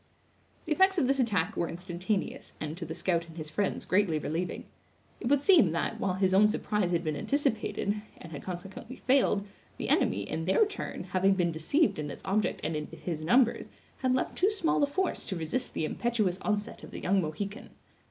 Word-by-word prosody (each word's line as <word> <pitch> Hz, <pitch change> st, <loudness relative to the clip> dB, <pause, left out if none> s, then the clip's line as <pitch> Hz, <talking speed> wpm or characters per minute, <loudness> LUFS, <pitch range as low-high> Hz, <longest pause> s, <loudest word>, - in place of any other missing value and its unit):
The -, -, -7 dB
effects 380 Hz, +4 st, +4 dB
of 270 Hz, -, +3 dB
this 275 Hz, +1 st, +2 dB
attack 205 Hz, -9 st, +1 dB
were 170 Hz, -, -1 dB
instantaneous, 180 Hz, +4 st, -3 dB
and 155 Hz, 0 st, -4 dB
to 170 Hz, -1 st, -6 dB
the 160 Hz, -, -5 dB
scout 170 Hz, -1 st, 0 dB
and 165 Hz, 0 st, -13 dB
his 155 Hz, -1 st, -6 dB
friends 200 Hz, +5 st, -1 dB
greatly 185 Hz, -4 st, +2 dB
relieving. 160 Hz, +4 st, -3 dB, 0.5 s
It -, -, -4 dB
would 280 Hz, +1 st, +4 dB
seem 290 Hz, -, +6 dB
that, 170 Hz, -, -1 dB
while 185 Hz, -2 st, 0 dB
his 190 Hz, 0 st, +2 dB
own 205 Hz, +2 st, +7 dB
surprise 210 Hz, -3 st, 0 dB
had 170 Hz, -1 st, +1 dB
been 155 Hz, -2 st, -1 dB
anticipated, 220 Hz, -, 0 dB, 0.2 s
and 165 Hz, -, -11 dB
had 145 Hz, -, -6 dB
consequently 190 Hz, +7 st, -7 dB
failed, 250 Hz, -7 st, +2 dB, 0.3 s
the -, -, -3 dB
enemy, 100 Hz, +1 st, +2 dB
in 160 Hz, +6 st, -3 dB
their 190 Hz, -, +4 dB
turn, 400 Hz, -, -5 dB
having 185 Hz, +1 st, +2 dB
been 175 Hz, -2 st, +1 dB
deceived 165 Hz, -, +1 dB
in 150 Hz, -1 st, -3 dB
its -, -, -8 dB
object 210 Hz, +2 st, 0 dB
and 155 Hz, +1 st, -1 dB
in 150 Hz, 0 st, -3 dB
his 160 Hz, -3 st, -5 dB
numbers, 235 Hz, +8 st, +3 dB, 0.3 s
had 255 Hz, -1 st, +2 dB
left 255 Hz, -, -1 dB
too 380 Hz, -, +3 dB
small 345 Hz, -8 st, +1 dB
a 285 Hz, -, +4 dB
force 370 Hz, +6 st, -1 dB
to 190 Hz, -, -3 dB
resist 170 Hz, +10 st, -3 dB
the 155 Hz, -, 0 dB
impetuous 215 Hz, -2 st, 0 dB
onset 210 Hz, -1 st, -2 dB
of -, -, -9 dB
the -, -, -7 dB
young 195 Hz, +1 st, +2 dB
Mohican. 195 Hz, +8 st, -5 dB
190 Hz, 200 wpm, -29 LUFS, 165-245 Hz, 0.5 s, own